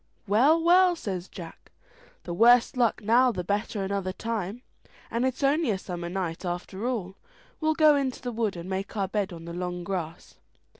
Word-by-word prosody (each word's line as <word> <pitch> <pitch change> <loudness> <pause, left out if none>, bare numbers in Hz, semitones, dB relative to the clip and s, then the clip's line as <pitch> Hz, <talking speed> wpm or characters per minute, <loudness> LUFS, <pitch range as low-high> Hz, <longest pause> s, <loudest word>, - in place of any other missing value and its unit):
"Well, 255 +11 +4
well," 355 +2 +5
says 190 - -5
Jack, 170 -3 -11 0.5
"the 175 - -5
worse 235 +7 +5
luck 235 -3 +1
now 245 +4 +4
the 185 -5 -4
better 205 +2 -2
another 195 -1 -2
time, 225 +2 -4 0.5
and 235 +3 +1
it's 260 +2 -4
only 290 +1 +2
a 200 - +1
summer 175 -2 -6
night 180 -2 -3
after 180 +5 -4
all. 200 -7 -3 0.4
We'll 315 0 +1
go 305 -2 +6
into 270 -3 -1
the 245 - -4
wood, 225 -4 -1
and 170 +1 -7
make 195 +3 -4
our 195 -1 0
bed 200 -1 -2
on 165 -1 -9
the 170 - -7
long 180 0 -4
grass." 170 -3 -5
205 Hz, 185 wpm, -27 LUFS, 180-250 Hz, 0.5 s, go